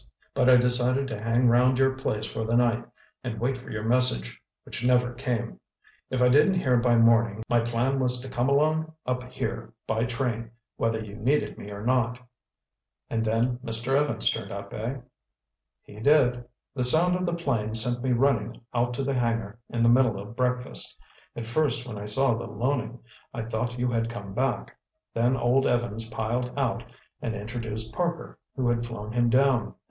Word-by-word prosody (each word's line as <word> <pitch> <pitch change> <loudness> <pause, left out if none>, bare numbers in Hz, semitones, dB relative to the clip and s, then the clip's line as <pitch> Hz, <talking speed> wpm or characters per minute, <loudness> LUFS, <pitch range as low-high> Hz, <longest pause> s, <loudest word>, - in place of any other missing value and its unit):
But 125 - +3
I 130 - +8
decided 125 +2 +2
to 105 -2 -5
hang 115 +2 +2
round 125 +2 +4
your 135 0 +3
place 110 -5 -2
for 110 - -4
the 115 +1 0
night 120 -1 +2 0.4
and 115 -4 -4
wait 130 +3 0
for 125 - -11
your 105 0 -4
message—which 115 - -1
never 125 0 +3
came. 120 -2 -3 0.5
If 130 -1 +1
I - - +6
didn't 150 +9 +5
hear 130 -7 +2
by 120 0 +3
morning, 115 -2 +4
my 120 - +3
plan 120 +4 0
was 125 -1 +1
to 135 - -7
come 125 0 0
along 155 +3 +2
up 125 0 -1
here - - -4
by 110 +1 0
train, 115 -1 -2 0.3
whether 115 -1 0
you 105 -1 -8
needed 135 +8 0
me 100 - -8
or 100 +1 -7
not." 125 -1 +1 0.9
"And 115 -1 0
then 115 +3 0
Mr. 120 +2 0
Evans 140 -6 +1
turned 110 -3 -5
up, 100 0 -7
eh?" 120 +5 -4 0.8
"He 105 - -13
did. 125 -2 +3 0.3
The 130 - -1
sound 165 +8 +5
of 180 0 -1
the 170 - 0
plane 115 -10 -1
sent 120 +2 +1
me 130 - +1
running 120 -3 +1
out 120 0 0
to 140 - -2
the 140 +1 -1
hangar 115 -3 -1
in 115 -1 0
the - - +5
middle 120 -4 +4
of 105 +3 -9
breakfast. 125 0 -2 0.4
At 115 - -5
first 125 0 0
when 105 -4 -6
I 105 - -6
saw 120 +4 +2
the 115 +1 -4
Loening, 120 +1 -2 0.4
I 115 - -3
thought 115 +2 -3
you 125 0 0
had 115 -1 0
come 100 -4 -7
back. 130 +3 -1 0.4
Then 120 +3 +2
old 125 +2 +2
Evans 115 -2 -1
piled 120 +3 -2
out 120 -4 0 0.4
and 115 -2 -3
introduced 110 +1 -5
Parker, 170 +1 -3 0.2
who 130 -3 0
had 120 0 +1
flown 110 -3 -6
him 120 0 +2
down. 125 -3 +2
120 Hz, 185 wpm, -26 LUFS, 115-130 Hz, 0.9 s, I